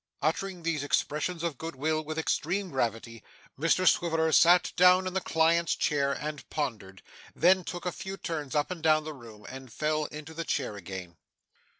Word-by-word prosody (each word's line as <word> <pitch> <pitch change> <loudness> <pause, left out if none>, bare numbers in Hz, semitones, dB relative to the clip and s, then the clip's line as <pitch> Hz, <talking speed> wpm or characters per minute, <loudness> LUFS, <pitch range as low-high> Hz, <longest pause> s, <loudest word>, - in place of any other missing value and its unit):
Uttering 175 +3 -1
these 165 -3 -1
expressions 155 +4 -1
of 165 -7 -3
good 165 -1 -6
will 155 +3 -1
with 155 +1 -6
extreme 175 +4 -1
gravity, 115 -2 -2 0.3
Mr 165 +5 +2
Swiveller 160 -2 +3
sat 170 +6 +5
down 180 +1 +6
in 185 - -3
the 190 - 0
client's 165 0 +2
chair 140 -2 +1
and 150 +1 -5
pondered; 105 -10 -4 0.3
then 185 +2 +4
took 175 +1 -6
a 180 - 0
few 195 +2 -7
turns 150 -7 -4
up 150 +4 +1
and 180 -3 -5
down 155 -1 +3
the 155 0 -6
room 115 -6 -13
and 130 -1 -9
fell 155 +3 -1
into 155 +2 -8
the 165 +1 -4
chair 130 -8 -2
again. 95 -3 -8
155 Hz, 180 wpm, -29 LUFS, 135-170 Hz, 0.3 s, down